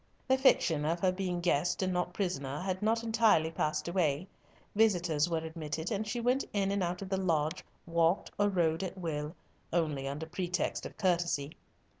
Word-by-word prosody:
The 260 Hz, -, +5 dB
fiction 170 Hz, -, +3 dB
of 165 Hz, +3 st, 0 dB
her 185 Hz, -, +3 dB
being 180 Hz, -2 st, -2 dB
guest 175 Hz, +2 st, +1 dB
and 185 Hz, -1 st, 0 dB
not 180 Hz, 0 st, -1 dB
prisoner 145 Hz, -8 st, -2 dB
had 185 Hz, +1 st, -2 dB
not 225 Hz, +2 st, +1 dB
entirely 220 Hz, -8 st, +3 dB
passed 155 Hz, -1 st, -1 dB
away; 170 Hz, -3 st, +1 dB, 0.5 s
visitors 175 Hz, -7 st, +3 dB
were 165 Hz, -, 0 dB
admitted, 160 Hz, +1 st, -4 dB
and 215 Hz, 0 st, -1 dB
she 220 Hz, +3 st, -2 dB
went 250 Hz, +3 st, +2 dB
in 195 Hz, -1 st, +1 dB
and 200 Hz, 0 st, 0 dB
out 180 Hz, +1 st, -2 dB
of 190 Hz, -, -8 dB
the 190 Hz, -, 0 dB
lodge, 165 Hz, -1 st, 0 dB, 0.2 s
walked 170 Hz, +2 st, +1 dB
or 205 Hz, 0 st, +4 dB
rode 170 Hz, -3 st, +1 dB
at 190 Hz, 0 st, -4 dB
will, 155 Hz, -2 st, -3 dB, 0.4 s
only 155 Hz, -5 st, 0 dB
under 145 Hz, +3 st, -4 dB
pretext 180 Hz, +2 st, -2 dB
of -, -, -16 dB
courtesy. 170 Hz, -6 st, 0 dB
175 Hz, 180 wpm, -31 LUFS, 160-195 Hz, 0.5 s, The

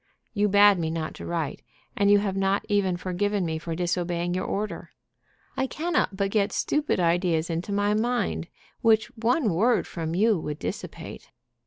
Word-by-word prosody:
You 210 Hz, -1 st, +2 dB
bade 205 Hz, -1 st, +6 dB
me 160 Hz, -1 st, -1 dB
not 160 Hz, -1 st, -3 dB
to -, -, -8 dB
write, 165 Hz, -4 st, -3 dB, 0.3 s
and 200 Hz, 0 st, +3 dB
you 205 Hz, -, +7 dB
have 200 Hz, -2 st, -1 dB
not 195 Hz, +1 st, +1 dB
even 195 Hz, -3 st, +1 dB
forgiven 190 Hz, +2 st, -1 dB
me 160 Hz, -1 st, -2 dB
for 165 Hz, 0 st, -4 dB
disobeying 175 Hz, 0 st, -1 dB
your 185 Hz, +1 st, -2 dB
order. 210 Hz, +1 st, -4 dB, 0.7 s
I 265 Hz, -, 0 dB
cannot 310 Hz, -, -1 dB
but 195 Hz, 0 st, 0 dB
get 205 Hz, -1 st, +1 dB
stupid 295 Hz, -8 st, 0 dB
ideas 170 Hz, -1 st, +1 dB
into 170 Hz, +5 st, -3 dB
my 205 Hz, +1 st, +1 dB
mind, 240 Hz, +3 st, -1 dB, 0.3 s
which 220 Hz, -2 st, +3 dB
one 230 Hz, -, +1 dB
word 230 Hz, +8 st, +2 dB
from 165 Hz, -1 st, -4 dB
you 210 Hz, 0 st, +3 dB
would 150 Hz, -1 st, -4 dB
dissipate. -, -, -7 dB
195 Hz, 170 wpm, -26 LUFS, 170-210 Hz, 0.7 s, you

